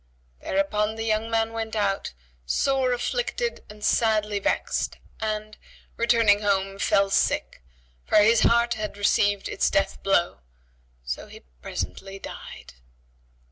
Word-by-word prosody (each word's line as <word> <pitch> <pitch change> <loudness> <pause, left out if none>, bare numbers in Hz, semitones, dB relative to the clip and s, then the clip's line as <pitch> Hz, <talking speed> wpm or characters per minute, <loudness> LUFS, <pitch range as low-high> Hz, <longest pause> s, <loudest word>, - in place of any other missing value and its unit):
Thereupon 210 +3 0
the 225 - -4
young 220 0 0
man 225 0 0
went 225 -1 -4
out, 200 - -1 0.3
sore 260 - +1
afflicted 480 - -2
and 210 0 -12
sadly 215 -3 +2
vexed - - -1 0.2
and, 215 -1 -4 0.4
returning 230 -3 +3
home, 195 -1 0
fell 200 -1 +2
sick, - - 0 0.5
for - - +3
his 220 +2 +6
heart 235 +1 +3
had 215 -2 -5
received 205 0 +2
its - - +1
death 195 0 0
blow; 175 - +1 0.7
so - - -4
he - - -13 0.2
presently 195 - -5
died. - - -10
215 Hz, 125 wpm, -25 LUFS, 200-225 Hz, 0.7 s, his